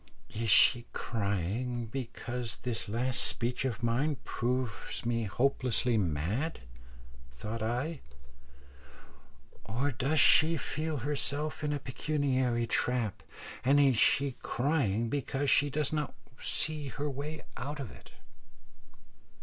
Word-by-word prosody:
"Is 115 Hz, +1 st, -2 dB
she 120 Hz, +4 st, +6 dB
crying 110 Hz, +3 st, -2 dB
because 120 Hz, -1 st, -5 dB
this 120 Hz, -4 st, -2 dB
last 125 Hz, +3 st, 0 dB
speech 125 Hz, +2 st, -1 dB
of 120 Hz, -4 st, -3 dB
mine 135 Hz, +6 st, +1 dB
proves 120 Hz, -3 st, -2 dB
me 115 Hz, -1 st, 0 dB
hopelessly 125 Hz, +1 st, +1 dB
mad?" 100 Hz, -, -1 dB, 0.7 s
thought 105 Hz, -, -5 dB
I; 130 Hz, +8 st, -2 dB, 1.6 s
"or 125 Hz, +6 st, -1 dB
does 135 Hz, +6 st, +1 dB
she 160 Hz, +2 st, +6 dB
feel 155 Hz, +1 st, -3 dB
herself 145 Hz, +3 st, -2 dB
in 150 Hz, -, 0 dB
a 145 Hz, -, 0 dB
pecuniary 130 Hz, -3 st, 0 dB
trap, 115 Hz, -3 st, 0 dB, 0.4 s
and 140 Hz, +3 st, +5 dB
is 135 Hz, -3 st, +5 dB
she 135 Hz, +4 st, +3 dB
crying 120 Hz, -5 st, +1 dB
because 140 Hz, +1 st, 0 dB
she 145 Hz, +1 st, +5 dB
does 150 Hz, +1 st, 0 dB
not 150 Hz, -1 st, -2 dB, 0.2 s
see 155 Hz, -2 st, 0 dB
her 145 Hz, +3 st, -3 dB
way 145 Hz, +3 st, -5 dB
out 145 Hz, +4 st, -5 dB
of 135 Hz, -6 st, -5 dB
it?" -, -, -15 dB
125 Hz, 115 wpm, -31 LUFS, 115-145 Hz, 1.6 s, she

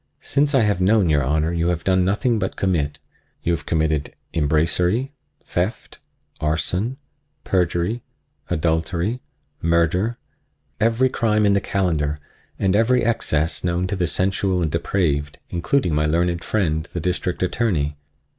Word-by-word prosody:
Since 145 Hz, +1 st, +1 dB
I 130 Hz, -, +5 dB
have 105 Hz, -4 st, +1 dB
known 95 Hz, -3 st, +4 dB
your 75 Hz, -2 st, +3 dB
Honor 80 Hz, +5 st, +1 dB
you 85 Hz, 0 st, 0 dB
have 85 Hz, -1 st, -1 dB
done 95 Hz, -1 st, +3 dB
nothing 110 Hz, +5 st, +1 dB
but 95 Hz, -, -2 dB
commit. 80 Hz, -7 st, 0 dB, 0.5 s
You 85 Hz, -, +1 dB
have 75 Hz, -4 st, -4 dB
committed 80 Hz, -2 st, 0 dB, 0.2 s
embracery, 85 Hz, -, +1 dB, 0.3 s
theft, 95 Hz, +6 st, -3 dB, 0.4 s
arson, 90 Hz, +10 st, 0 dB, 0.5 s
perjury, 90 Hz, +5 st, 0 dB, 0.5 s
adultery, 85 Hz, +8 st, 0 dB, 0.4 s
murder—every 105 Hz, +7 st, 0 dB
crime 110 Hz, -4 st, +1 dB
in 100 Hz, -, +4 dB
the 100 Hz, -, +2 dB
calendar 80 Hz, -7 st, 0 dB, 0.4 s
and 95 Hz, 0 st, +1 dB
every 115 Hz, +2 st, +3 dB
excess 80 Hz, -8 st, 0 dB
known 90 Hz, 0 st, 0 dB
to 95 Hz, -, -2 dB
the 90 Hz, -2 st, 0 dB
sensual 95 Hz, 0 st, +1 dB
and 80 Hz, -, -1 dB
depraved, 75 Hz, -4 st, 0 dB
including 90 Hz, -, +1 dB
my 75 Hz, +1 st, +2 dB
learned 85 Hz, +2 st, +1 dB
friend, 80 Hz, -6 st, -1 dB
the 90 Hz, -, -2 dB
District 90 Hz, +1 st, -1 dB
Attorney. 85 Hz, -8 st, 0 dB
90 Hz, 135 wpm, -22 LUFS, 80-105 Hz, 0.5 s, I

